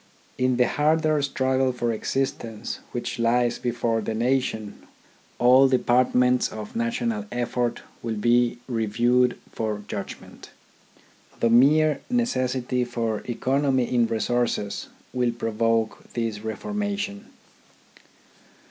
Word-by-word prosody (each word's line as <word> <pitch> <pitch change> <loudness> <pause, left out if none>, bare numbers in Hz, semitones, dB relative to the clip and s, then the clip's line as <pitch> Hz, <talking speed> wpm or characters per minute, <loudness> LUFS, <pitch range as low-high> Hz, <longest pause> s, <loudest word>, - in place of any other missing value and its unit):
In 130 -1 +2
the 125 - +4
harder 155 0 +2
struggle 130 -1 +1
for 120 -1 -1
existence 115 -2 -3
which 120 -1 -4
lies 120 +1 +2
before 115 -2 -1
the 110 +1 -3
nation, 115 -3 -1 0.5
all 130 +2 +6
departments 125 0 +3
of 110 -1 -8
national 235 -2 -1
effort 120 0 -2 0.2
will 115 -1 -3
be 120 +3 +2
reviewed 120 +2 +2
for 105 -2 -3
judgment. 100 -2 -8 0.9
The 115 - +2
mere 145 +4 +5
necessity 130 - 0
for 115 -3 -2
economy 130 +1 +1
in 120 -2 +3
resources 115 -2 -1 0.2
will 125 -2 +1
provoke 115 -1 0
this 115 -3 -2
reformation. 205 - -4
125 Hz, 105 wpm, -25 LUFS, 115-135 Hz, 0.9 s, all